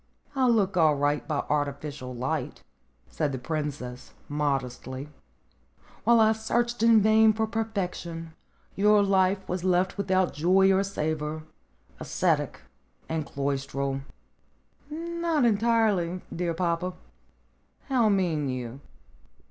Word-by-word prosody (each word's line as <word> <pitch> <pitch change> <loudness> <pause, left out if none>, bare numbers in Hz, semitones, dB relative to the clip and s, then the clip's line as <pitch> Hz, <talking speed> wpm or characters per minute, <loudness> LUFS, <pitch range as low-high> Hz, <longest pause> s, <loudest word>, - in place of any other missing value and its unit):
"I 260 -1 +3
look 205 -6 +2
all 160 -4 +4
right 145 +1 0
by 150 -3 -1
artificial 145 -3 -3
light," 125 +2 -3 0.4
said 140 - -2
the 130 - -3
princess 140 -3 -5
modestly. 135 -2 -3 1.0
"While 235 +1 +6
I 220 0 +5
searched 235 +2 -1
in 230 -1 +6
vain 220 0 +5
for 220 +1 0
perfection, 180 -7 -4 0.4
your 210 +1 +4
life 190 0 +2
was 180 0 -3
left 185 +1 +1
without 185 -2 +1
joy 190 +5 +4
or 190 - +3
savor, 155 -5 -3 0.6
ascetic, - - 0 0.5
and 160 -2 -3
cloistral." 140 0 -2 0.9
"Not 335 -2 -1
entirely, 210 -6 +2
dear 170 -1 -1
papa." 175 +1 -1 0.9
"How 245 -5 +3
mean 170 -8 +1
you?" 125 0 -5
180 Hz, 110 wpm, -27 LUFS, 145-215 Hz, 1.0 s, While